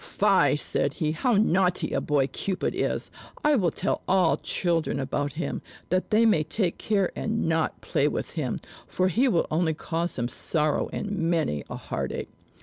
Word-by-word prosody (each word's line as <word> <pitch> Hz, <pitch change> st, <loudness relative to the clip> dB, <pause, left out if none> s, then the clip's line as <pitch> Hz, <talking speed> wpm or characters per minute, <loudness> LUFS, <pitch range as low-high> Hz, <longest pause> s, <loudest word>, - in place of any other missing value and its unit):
"Fie!" 200 Hz, -6 st, +3 dB
said 145 Hz, -1 st, 0 dB
he. 155 Hz, -3 st, -1 dB
"How 240 Hz, -, +1 dB
naughty 190 Hz, -3 st, +2 dB
a -, -, +1 dB
boy 145 Hz, -2 st, +2 dB
Cupid 180 Hz, +8 st, -2 dB
is! -, -, -2 dB, 0.3 s
I 300 Hz, 0 st, +4 dB
will 185 Hz, -9 st, +2 dB
tell -, -, -2 dB
all 185 Hz, -3 st, +3 dB
children 165 Hz, -5 st, 0 dB
about 140 Hz, +1 st, -2 dB
him, 170 Hz, -, -3 dB, 0.3 s
that 185 Hz, +1 st, 0 dB
they 220 Hz, +2 st, +4 dB
may 210 Hz, -9 st, +4 dB
take 180 Hz, +1 st, -1 dB
care 200 Hz, -4 st, +1 dB
and 225 Hz, +1 st, -1 dB
not 160 Hz, -1 st, 0 dB
play -, -, +1 dB
with -, -, -3 dB
him, -, -, -2 dB, 0.3 s
for 185 Hz, +1 st, +1 dB
he 240 Hz, +9 st, +3 dB
will 175 Hz, -9 st, +2 dB
only 160 Hz, 0 st, +1 dB
cause 170 Hz, +2 st, -2 dB
them 120 Hz, -1 st, -1 dB
sorrow 150 Hz, +3 st, 0 dB
and 205 Hz, -, -4 dB
many 165 Hz, -, 0 dB
a -, -, -5 dB
heartache." -, -, -4 dB
175 Hz, 175 wpm, -26 LUFS, 155-200 Hz, 0.3 s, I